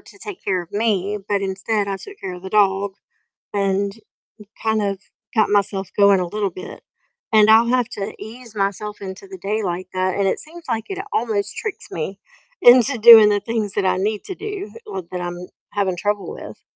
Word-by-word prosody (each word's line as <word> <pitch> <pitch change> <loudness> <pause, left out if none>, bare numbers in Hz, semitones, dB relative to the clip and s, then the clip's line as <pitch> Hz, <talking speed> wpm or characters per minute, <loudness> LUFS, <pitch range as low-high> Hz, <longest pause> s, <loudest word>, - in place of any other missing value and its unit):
to - - -17
take 405 -3 -8
care 190 -2 0
of 175 +1 -12
me, 205 -2 0
but 200 -1 +1
instead 200 +2 -1
I 195 -1 -2
took 405 - -12
care 185 -1 -5
of 180 - -11
the 190 - -7
dog, 200 -1 +2 0.6
and 200 0 0 0.7
kind 220 -1 +1
of 195 -1 -2 0.3
got 220 -3 +3
myself 200 -2 0
going 200 -2 +6
a 180 - -1
little 200 +1 -2
bit, 185 - -10 0.5
and 215 -1 +6
I'll 225 +2 +6
have 250 -2 +1
to 200 0 -4
ease 230 0 -10
myself 205 +1 -2
into 190 - -7
the 380 -1 -10
day 215 +2 -2
like 180 0 -3
that, 185 0 0
and 200 -1 +1
it - - 0
seems 330 +2 -10
like 225 -1 -1
it 385 0 -4
almost 220 -3 -1
tricks 435 -4 -5
me 190 +5 -5 0.4
into 250 -1 +6
doing 220 -1 +10
the 205 -1 +2
things 215 -2 -2
that 205 - 0
I 185 - +2
need 210 +2 -1
to 380 - -5
do 410 0 -6
or 190 - -5
that 180 - -4
I'm 175 0 -5 0.3
having 195 -3 0
trouble 205 +2 -2
with. - - -10
205 Hz, 200 wpm, -21 LUFS, 195-225 Hz, 0.7 s, doing